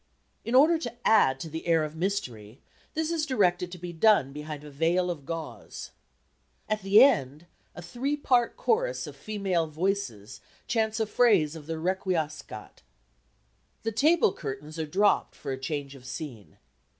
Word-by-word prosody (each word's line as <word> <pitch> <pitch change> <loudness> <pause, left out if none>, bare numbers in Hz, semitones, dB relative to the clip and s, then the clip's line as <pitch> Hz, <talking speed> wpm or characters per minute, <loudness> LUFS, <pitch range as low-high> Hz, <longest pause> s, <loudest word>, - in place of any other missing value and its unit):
In 235 - -1
order 315 +5 +6
to 240 -6 -5
add 135 -12 +4
to - - -5
the 160 +2 -6
air 165 -2 +3
of 155 +1 -5
mystery 130 - -3 0.4
this 320 +1 -1
is 330 -2 0
directed 180 -8 +1
to 180 - -7
be 175 0 -7
done 165 -6 +4
behind 150 0 -7
a 150 - -10
veil 170 +5 +1
of 145 -5 -8
gauze. 165 -1 -7 0.8
At 215 0 -1
the 200 +5 +7
end, 150 - +2 0.3
a 175 - -8
three 260 - -2
part 250 - +2
chorus - - 0
of - - -9
female 195 -6 -1
voices 155 - -3 0.2
chants 220 -1 0
a 220 - +2
phrase 205 -9 +3
of 155 -2 -10
the 165 0 -3
Requiescat. 160 - -3 1.0
The 225 - -1
tableaux 300 - +4
curtains 150 +2 -7
are 160 - -2
dropped 200 +6 +2
for 140 - -6
a 130 - -4
change 140 0 -4
of 130 -2 -14
scene. 130 - -8
175 Hz, 160 wpm, -28 LUFS, 150-220 Hz, 1.0 s, the